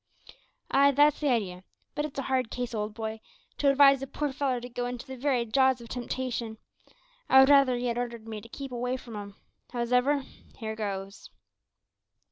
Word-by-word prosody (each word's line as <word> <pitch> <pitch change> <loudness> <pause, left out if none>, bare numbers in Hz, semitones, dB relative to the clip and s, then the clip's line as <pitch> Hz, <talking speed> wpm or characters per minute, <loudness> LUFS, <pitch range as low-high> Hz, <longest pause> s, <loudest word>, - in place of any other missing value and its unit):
"Aye, 280 +1 +6
that's 290 +1 +4
the 295 - +1
idee; 195 -7 -1 0.3
but 295 - -1
it's 300 - -8
a 275 - -1
hard 255 -3 0
case, 245 -1 -4
old 210 -1 -3
boy, 220 -1 -4 0.4
to 285 - +4
advise 275 -1 +6
a 270 - -4
poor 290 +1 -3
feller 265 -3 0
to 245 - -8
go 245 0 -3
into 245 0 -6
the 265 -1 -8
very 255 -2 0
jaws 260 +2 +3
o' 235 - -10
temptation. 240 -2 -4 0.7
I 265 - +8
would 265 +1 +7
rather 275 -3 +6
'ee 245 +1 -3
had 240 0 -1
ordered 235 -2 -5
me 215 -2 -6
to 230 - -14
keep 275 +2 -7
away 250 +1 -2
from 235 -3 -10
'em. 200 -1 -7 0.4
Howsever, 250 +4 +1 0.3
here 220 -2 -5
goes!" 200 -2 -5
245 Hz, 190 wpm, -28 LUFS, 225-270 Hz, 0.7 s, I